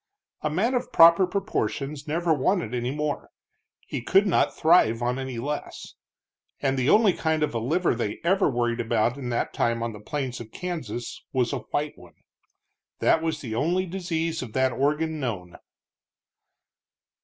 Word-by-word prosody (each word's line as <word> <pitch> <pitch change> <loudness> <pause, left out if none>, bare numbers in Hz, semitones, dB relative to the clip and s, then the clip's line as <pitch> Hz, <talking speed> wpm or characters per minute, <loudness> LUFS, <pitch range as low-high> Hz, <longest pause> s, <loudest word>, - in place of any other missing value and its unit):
A 150 - 0
man 200 +11 +1
of 250 - -2
proper 170 +3 +7
proportions 155 -7 -3
never 165 +2 +1
wanted 155 - 0
any 120 0 -1
more; 150 +1 -3 0.6
he - - -4
could 195 - +4
not 190 - +1
thrive 155 -9 +4
on 125 +2 0
any 130 -2 -5
less. 145 +5 -5 0.7
And 135 -1 0
the 130 +1 +1
only 210 -3 +5
kind 160 -2 0
of 150 - -1
a 115 - -1
liver 165 +10 +1
they 115 -3 -3
ever 190 +2 +3
worried 120 -2 -1
about 115 0 +1
in 135 -3 -5
that 120 - -1
time 115 0 0
on 115 -1 -3
the 105 - -10
plains 130 +3 -4
of 115 -2 -10
Kansas 140 -10 -5
was 130 0 +1
a 140 - -1
white 150 0 -2
one. - - -16 0.8
That 160 - +3
was 160 -1 -2
the 115 -5 -5
only 170 +10 +1
disease 165 -3 -2
of 120 -4 -7
that 130 0 +2
organ 150 +5 0
known. 100 - -4
145 Hz, 165 wpm, -25 LUFS, 120-165 Hz, 0.8 s, proper